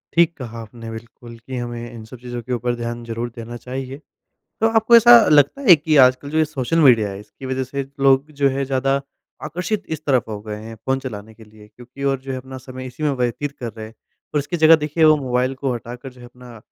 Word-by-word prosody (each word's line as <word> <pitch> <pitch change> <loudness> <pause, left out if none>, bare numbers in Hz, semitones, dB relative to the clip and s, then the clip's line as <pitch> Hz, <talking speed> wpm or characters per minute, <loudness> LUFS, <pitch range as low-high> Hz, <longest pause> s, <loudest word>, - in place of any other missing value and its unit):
ठीक 170 0 +4
कहा 115 -3 -7
आपने 115 +1 -10
बिल्कुल, 115 +1 -11
कि 130 +2 -7
हमें 120 -1 -5
इन 115 -2 -10
सब 125 +3 -11
चीज़ों 120 -1 -6
के 125 +3 -5
ऊपर 120 0 -1
ध्यान 120 0 -5
ज़रूर 115 +1 -4
देना 120 +1 -7
चाहिए। 130 +2 -6 0.6
तो 225 - +4
आपको 230 +2 +6
ऐसा 240 +1 +8 0.2
लगता 145 - +4
है 175 - +11
कि 155 0 0
आजकल 130 +3 0
जो 155 - 0
ये 155 - +4
सोशल 150 +1 -2
मीडिया 115 -8 +5
है 95 - -7
इसकी 130 +5 -12
वजह 130 0 -2
से 140 +2 -4 0.2
लोग 135 +2 +3
जो 140 - +5
है 135 +1 -2
ज़्यादा 135 +1 0 0.4
आकर्षित 180 +7 -3
इस 155 - -21
तरफ 130 -5 +1
हो 105 -2 -5
गए 105 -1 -6
हैं, 115 0 -9
फ़ोन 130 +5 -2
चलाने 110 -4 -8
के 110 - -15
लिए 105 0 -17
क्योंकि 125 +5 -11
और 135 - -3
जो 135 0 -9
है 130 - -3
अपना 130 +1 -9
समय 130 0 -9
इसी 125 +4 -9
में 150 - +2
व्यतीत 135 +4 -2
कर 115 -3 -5
रहे 110 0 -8
हैं 110 - -14 0.4
और - - +3
इसकी 160 +5 -4
जगह 160 0 +7
देखिए 160 +2 +1
वो 155 0 +7
मोबाइल 130 -1 -1
को 130 -2 +1
हटाकर 120 +3 -8
जो 125 - -18
है 120 - -11
अपना 120 -1 -14
130 Hz, 240 wpm, -20 LUFS, 120-140 Hz, 0.6 s, है